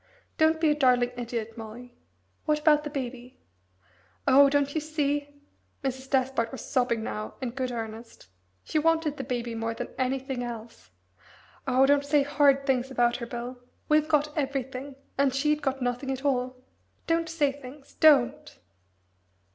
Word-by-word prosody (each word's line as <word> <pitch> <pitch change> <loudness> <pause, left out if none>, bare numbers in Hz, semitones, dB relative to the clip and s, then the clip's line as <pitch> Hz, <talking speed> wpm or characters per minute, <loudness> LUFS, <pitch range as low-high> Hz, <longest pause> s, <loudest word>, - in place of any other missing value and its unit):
"Don't 315 0 +4
be 315 -2 +3
a - - +2
darling 250 -4 +3
idiot, 230 -2 -4
Molly. 235 +2 -9 0.5
What 305 -1 +2
about 300 -1 +4
the 300 - -4
Baby?" 255 -2 -6 0.9
"Oh 275 +1 +7
don't 285 0 +1
you 315 - 0
see?" 290 -1 -2 0.4
Mrs. 265 0 -3
Despard 260 -3 +1
was 265 - -7
sobbing 245 -4 +1
now 215 -1 -5
in 255 -4 -3
good 255 0 -3
earnest. 225 - -7 0.4
"She 310 - 0
wanted 320 -1 +1
the 270 - -4
Baby 240 -2 -3
more 225 0 -3
than 245 - -5
anything 260 0 -1
else. 230 -1 -8 0.8
Oh 260 +1 +4
don't 285 +1 +4
say 285 0 +3
horrid 280 -1 +3
things 265 -1 +1
about 240 -2 +2
her, 235 -1 -6
Bill! 245 +1 -6 0.3
We've 305 0 +4
got 295 -1 +1
everything 270 -1 -3 0.2
and 275 -2 +3
she'd 300 +2 +1
got 270 -2 -1
nothing 245 +2 -2
at 265 +1 -3
all 255 -2 0 0.5
don't 330 0 +1
say 300 -4 +1
things 275 0 -12
don't!" 285 -6 +4
265 Hz, 155 wpm, -27 LUFS, 245-290 Hz, 0.9 s, Oh